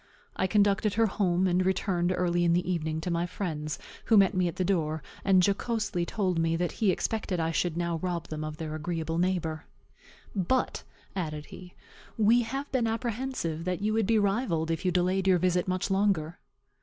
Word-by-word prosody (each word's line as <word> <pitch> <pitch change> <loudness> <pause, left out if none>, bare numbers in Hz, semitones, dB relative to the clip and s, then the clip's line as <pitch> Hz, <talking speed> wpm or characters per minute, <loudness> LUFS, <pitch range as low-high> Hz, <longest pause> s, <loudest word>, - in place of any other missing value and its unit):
I 190 - +1
conducted 200 0 +2
her 225 +1 +4
home, 185 -3 +1
and 180 0 +2
returned 185 -1 +1
early 175 -1 +1
in 170 -1 +3
the 175 +1 +1
evening 160 -3 -1
to 175 - -3
my 170 +1 0
friend's, 155 -5 -4 0.3
who 225 - +5
met 195 0 +5
me 185 -2 +2
at 170 - -4
the 185 - -1
door, 160 -5 0 0.2
and 190 -2 +5
jocosely 205 -4 -1
told 185 -5 0
me 165 0 +1
that 175 +1 -1
he 215 - +1
expected 200 0 -1
that 165 - 0
I 165 - 0
should 170 0 -1
now 170 -1 -1
rob 175 0 -3
them 155 0 -4
of 155 0 -5
their 155 -1 -5
agreeable 165 +1 -2
neighbor. 175 -3 -1 0.7
"But," 205 +7 0 0.3
added 155 -5 -3
he, 180 -1 -11 0.4
"we 225 +3 +5
have 270 +5 -4
been 250 -4 +1
apprehensive 225 -7 -2
that 180 +2 -2
you 215 +1 +1
would 220 -3 +1
be 225 - +3
rivalled 195 -6 +1
if 165 +3 -3
you 180 - +3
delayed 185 +2 +1
your 185 -1 +5
visit 180 +1 +1
much 185 +2 -1
longer." 190 -5 +1
180 Hz, 195 wpm, -28 LUFS, 165-200 Hz, 0.7 s, who